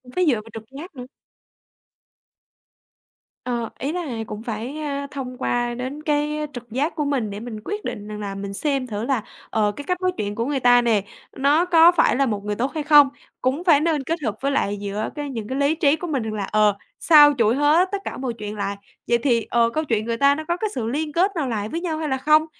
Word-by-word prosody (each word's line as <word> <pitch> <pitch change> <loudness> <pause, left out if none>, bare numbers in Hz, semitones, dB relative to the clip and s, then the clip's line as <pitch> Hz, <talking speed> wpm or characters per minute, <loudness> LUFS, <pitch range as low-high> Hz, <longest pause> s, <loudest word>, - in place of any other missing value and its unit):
phải 365 - +2
dựa 290 - +5
vào 215 +1 -8
trực 225 -1 -7
giác 335 +2 -9
nữa. 250 -1 -7 2.4
Ờ, 235 -2 -2
ý 275 +4 -2
là 360 +2 -2 0.3
cũng 215 +1 -7
phải, 235 +5 -5
a, 280 -2 -3
thông 255 -3 -6
qua 240 -2 -1
đến 260 +5 -5
cái 300 0 0
trực 245 -2 -9
giác 280 +8 -1
của 300 -2 -1
mình 260 -7 -1
để 200 - -6
mình 225 -1 -7
quyết 420 +1 -4
định 205 0 -5
rằng 210 0 -6
là 200 -1 -5
mình 200 0 -5
xem 275 +2 -1
thử 215 0 -4
là, 255 -6 0 0.3
ờ, 210 -2 +1
cái 285 - -7
cách 360 +3 -2
nói 370 0 +2
chuyện 205 0 -3
của 230 - -1
người 280 0 -1
ta 245 -1 +5
nè, 225 -4 +2 0.4
nó 290 +6 +3
có 340 -1 +7
phải 345 - +3
là 275 +2 +2
một 210 -5 -2
người 210 0 -2
tốt 255 +5 -1
hay 310 - -2
không? 295 -2 +7 0.3
Cũng 265 +6 0
phải 320 -6 +5
nên 310 -3 0
kết 330 +5 -2
hợp 215 -3 -1
với 275 +1 0
lại 205 -6 0
giữa 205 +2 -3
cái 290 -1 -4
những 225 -5 -5
cái 260 - -3
lý 285 +3 +2
trí 300 -2 +3
của 350 +3 -6
mình 275 -8 -1
rằng 220 - -4
là, 205 -2 -3
ờ, 210 0 +2 0.2
xâu 295 -3 +7
chuỗi 230 +1 +3
hết 305 +6 +3
tất 400 - 0
cả - - -5
mọi 255 -2 -3
chuyện 210 -2 -6
lại, 200 -1 -2 0.3
vậy 235 - +3
thì, 235 -3 +1
ờ, 235 -1 +3
câu 310 +7 -2
chuyện 225 -7 -1
người 230 0 -2
ta 280 +2 +4
nó 315 - -5
có 345 - 0
cái 430 +3 -2
sự 230 -4 -2
liên 300 +5 -2
kết 370 +5 +3
nào 300 -5 -1
lại 215 -2 -2
với 335 +6 -3
nhau 325 -3 -2
hay 310 -1 -3
là 265 - 0
không? 305 +3 +4
265 Hz, 250 wpm, -22 LUFS, 225-300 Hz, 2.4 s, có